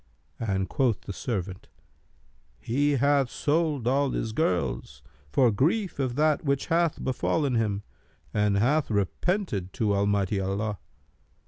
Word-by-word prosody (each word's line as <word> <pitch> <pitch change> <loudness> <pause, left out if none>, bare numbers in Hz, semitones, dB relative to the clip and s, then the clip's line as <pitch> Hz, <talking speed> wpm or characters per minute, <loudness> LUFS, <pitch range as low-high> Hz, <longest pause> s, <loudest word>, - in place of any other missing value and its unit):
and 95 -4 -1
quoth 125 -6 +1
the 100 - -7
servant, 95 -3 -4 0.9
'He 145 - +1
hath 140 -1 +3
sold 150 -5 0
all 140 +2 +2
his 115 - -2
girls, 75 - -1 0.3
for 125 - +4
grief 170 - 0
of 130 -3 -1
that 155 0 +2
which 140 -2 0
hath 170 -2 +1
befallen 135 +2 0
him, 105 -3 0 0.5
and 105 -1 +2
hath 140 +8 +2
repented 105 - -1
to 110 -5 +1
Almighty 100 0 +1
Allah.' 100 +1 -2
120 Hz, 125 wpm, -27 LUFS, 100-145 Hz, 0.9 s, for